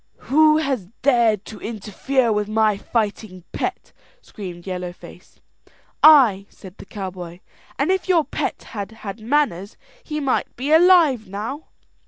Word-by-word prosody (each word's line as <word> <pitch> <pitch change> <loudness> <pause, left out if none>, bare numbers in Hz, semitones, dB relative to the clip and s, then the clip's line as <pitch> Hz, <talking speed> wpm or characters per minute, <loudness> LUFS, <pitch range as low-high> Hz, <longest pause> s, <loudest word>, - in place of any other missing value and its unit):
"Who 305 +1 +5
has 270 - -2 0.2
dared 235 -6 +3
to 215 - -10
interfere 230 +4 -1
with 210 -1 -1
my 215 -1 +2
fighting 205 -3 -3
pet?" - - -4 0.3
screamed 180 - -10
Yellow 180 -2 -4
Face. 175 - -16 0.6
"I," 245 -11 +6
said 190 -1 -14
the - - -12
cowboy; 180 -3 -8 0.4
"and - - +1
if 380 0 -1
your 340 -4 +4
pet - - -4
had 205 -2 -6
had 200 +2 -6
manners, 220 -6 -1 0.3
he 305 -1 -4
might 275 -3 -1
be 270 +5 -3
alive 320 - +5
now." 215 +10 -6
220 Hz, 140 wpm, -21 LUFS, 195-285 Hz, 0.6 s, I